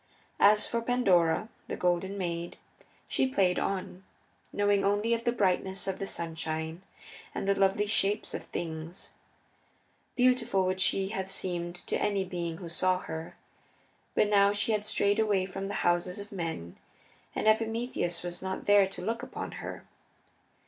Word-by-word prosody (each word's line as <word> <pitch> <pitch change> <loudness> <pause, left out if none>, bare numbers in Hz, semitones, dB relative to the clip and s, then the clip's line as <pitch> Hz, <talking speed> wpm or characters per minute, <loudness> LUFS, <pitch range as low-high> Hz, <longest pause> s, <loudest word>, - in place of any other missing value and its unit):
As 210 +1 +6
for 235 - -1
Pandora, 200 -7 +3 0.2
the - - -3
Golden 180 +2 0
Maid, 170 -2 -3 0.5
she 265 - +1
played 190 -8 +2
on, 190 -1 -3 0.5
knowing 205 -1 +2
only 205 +4 +2
the 235 +1 0
brightness 190 -3 0
of 195 -1 -3
the 195 - -3
sunshine 160 0 -3 0.5
and - - -2
the 200 - +5
lovely 195 +1 +2
shapes 205 0 0
of - - -5
things. 165 +1 -6 1.0
Beautiful 245 -6 +3
would 185 0 0
she 190 +1 +2
have 190 -3 -3
seemed 175 -2 -2
to - - -1
any 200 -2 +1
being 170 -2 -4
who 175 -1 -7
saw 185 +2 +2
her, 160 +1 -6 0.8
but - - +4
now 200 -1 +5
she 205 +2 0
had 210 -1 0
strayed 205 -1 +2
away 205 -4 +2
from 195 +1 -5
the 205 - -4
houses 175 +1 +2
of 205 0 -8
men 165 - -4 0.6
and - - 0
Epimetheus 220 -6 +1
was 175 0 -5
not 190 0 -4
there 205 -1 +6
to 195 - -8
look 230 +1 -1
upon 255 0 -6
her. - - -7
195 Hz, 155 wpm, -30 LUFS, 175-205 Hz, 1.0 s, As